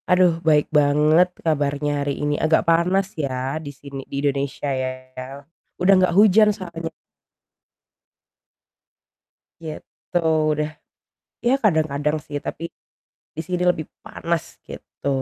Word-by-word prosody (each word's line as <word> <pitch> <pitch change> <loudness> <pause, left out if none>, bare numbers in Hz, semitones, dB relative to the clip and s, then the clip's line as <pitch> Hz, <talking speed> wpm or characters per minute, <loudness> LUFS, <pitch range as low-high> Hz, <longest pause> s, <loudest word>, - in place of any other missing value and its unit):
Aduh 180 -2 +4
baik 150 -2 +3
banget 150 +4 +4 0.2
kabarnya 145 -1 0
hari 140 0 -1
ini, 145 - +1
agak 160 +2 +3
panas 185 +4 +2
ya 135 0 -3
di 145 - -7
sini 140 -1 -9
di 140 - -5
Indonesia 140 0 -1
ya, 130 0 -1 0.9
udah 185 +2 +4 0.2
gak 175 - -2
hujan 210 +1 +6
soalnya. 170 -5 -5 2.7
Gitu, 160 +2 -6 0.3
udah 150 0 -1 0.8
ya 250 - +4
kadang-kadang 155 -5 +1
sih 145 - -4
tapi 165 - -5 0.7
di - - -3
sini 180 -1 -2
lebih 155 -3 -3 0.2
panas 170 -1 -2 0.2
gitu - - -8
155 Hz, 115 wpm, -22 LUFS, 145-175 Hz, 2.7 s, hujan